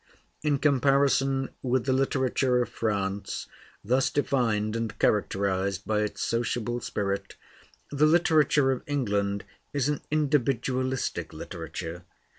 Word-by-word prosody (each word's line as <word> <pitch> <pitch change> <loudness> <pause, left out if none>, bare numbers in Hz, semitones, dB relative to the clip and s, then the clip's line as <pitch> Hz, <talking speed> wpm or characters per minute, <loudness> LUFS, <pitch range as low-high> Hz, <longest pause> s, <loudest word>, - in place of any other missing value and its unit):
In 150 -2 +2
comparison 135 -1 +2
with 130 -1 0
the 130 - +2
literature 130 -1 +1
of - - -8
France, 100 -2 -2 0.4
thus 125 +5 +2
defined 115 -7 0
and 115 -1 -3
characterized 100 -1 0
by 110 -1 +1
its 105 0 -2
sociable 120 0 -1
spirit, 100 -2 -3 0.6
the 145 +2 +4
literature 155 -4 +4
of 130 - -2
England 100 -8 0 0.3
is 140 -1 +1
an 150 - -1
individualistic 130 -3 0
literature. 85 +2 -6
125 Hz, 110 wpm, -27 LUFS, 105-140 Hz, 0.6 s, the